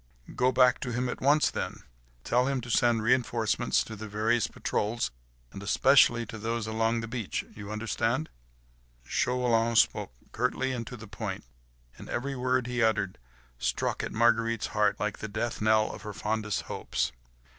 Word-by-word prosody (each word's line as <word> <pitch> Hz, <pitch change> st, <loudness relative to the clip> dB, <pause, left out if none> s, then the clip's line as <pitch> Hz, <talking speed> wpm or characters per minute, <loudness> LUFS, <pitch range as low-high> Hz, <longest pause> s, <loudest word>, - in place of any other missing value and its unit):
"Go 125 Hz, +1 st, +3 dB
back 125 Hz, 0 st, +4 dB
to 125 Hz, -, -4 dB
him 125 Hz, +2 st, -1 dB
at -, -, -5 dB
once, 145 Hz, +3 st, +4 dB
then. -, -, -4 dB, 0.4 s
Tell 125 Hz, +2 st, +2 dB
him 135 Hz, -1 st, 0 dB
to 120 Hz, 0 st, -6 dB
send 115 Hz, -1 st, +3 dB
reinforcements 120 Hz, -2 st, +2 dB
to 110 Hz, -, -8 dB
the 110 Hz, +1 st, -7 dB
various 110 Hz, +2 st, +1 dB
patrols; 115 Hz, +3 st, -2 dB, 0.4 s
and 100 Hz, -, -8 dB
especially 120 Hz, +2 st, +4 dB
to 110 Hz, +1 st, -8 dB
those 115 Hz, +1 st, -2 dB
along 115 Hz, +1 st, 0 dB
the 115 Hz, -, -5 dB
beach—you 105 Hz, -2 st, -5 dB
understand?" 115 Hz, +6 st, -1 dB, 0.8 s
Chauvelin 115 Hz, -, +1 dB
spoke 110 Hz, -, +3 dB, 0.2 s
curtly 125 Hz, +2 st, 0 dB
and 120 Hz, -3 st, -4 dB
to 125 Hz, -, -7 dB
the 115 Hz, 0 st, -10 dB
point, 100 Hz, -1 st, -5 dB, 0.6 s
and -, -, -10 dB
every 135 Hz, +3 st, -2 dB
word 125 Hz, 0 st, +1 dB
he 125 Hz, 0 st, -2 dB
uttered 110 Hz, -4 st, +1 dB, 0.4 s
struck -, -, -1 dB
at -, -, -4 dB
Marguerite's 115 Hz, -1 st, +2 dB
heart 105 Hz, -1 st, +2 dB
like 105 Hz, 0 st, -2 dB
the 110 Hz, -, -4 dB
death 115 Hz, +3 st, -3 dB
knell 110 Hz, 0 st, +3 dB
of -, -, -9 dB
her 105 Hz, -1 st, -6 dB
fondest 105 Hz, 0 st, -2 dB
hopes. -, -, -2 dB
115 Hz, 165 wpm, -29 LUFS, 110-125 Hz, 0.8 s, back